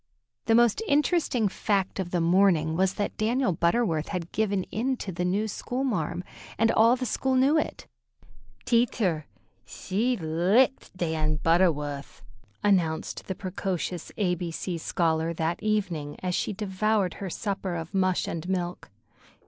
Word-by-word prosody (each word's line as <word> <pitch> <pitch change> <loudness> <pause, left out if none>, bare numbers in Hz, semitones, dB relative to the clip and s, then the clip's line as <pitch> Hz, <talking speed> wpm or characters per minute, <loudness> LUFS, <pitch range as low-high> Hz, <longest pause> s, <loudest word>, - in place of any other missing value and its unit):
The 225 - +4
most 240 - +4
interesting 295 - +2
fact 195 0 -1
of 185 -2 -2
the 175 - 0
morning 170 -2 +3
was 190 +2 +1
that 205 - -2
Daniel 225 -1 +1
Butterworth 170 -1 +1
had 175 -3 -4
given 200 -3 0
in 255 +4 -1
to 195 - -5
the 180 0 -3
new 195 +4 0
"school 250 +5 -3
marm," 180 - -1 0.3
and 225 0 +3
all 230 +2 +5
the 255 0 -3
school 260 +3 0
knew 270 +4 +4
it. 310 - -1 0.8
"Teatcher, 220 -10 +1 0.4
thshe 225 +5 -1
licked 185 +9 +2
Dan 160 -3 0
Butterwuth," 150 -5 0 0.4
announced 170 -6 +1
the 190 - -3
precocious 180 -2 -4
A 185 -4 +1
B 175 -1 -3
C 170 +1 -4
scholar 165 0 0
that 165 +1 -1
evening, 190 -9 -1
as 180 -1 -1
she - - 0
devoured 205 0 0
her 195 - -3
supper 195 -1 -3
of 165 +2 -6
mush 185 -2 +1
and 170 +2 -4
milk. 180 -2 -3
190 Hz, 150 wpm, -27 LUFS, 170-220 Hz, 0.8 s, all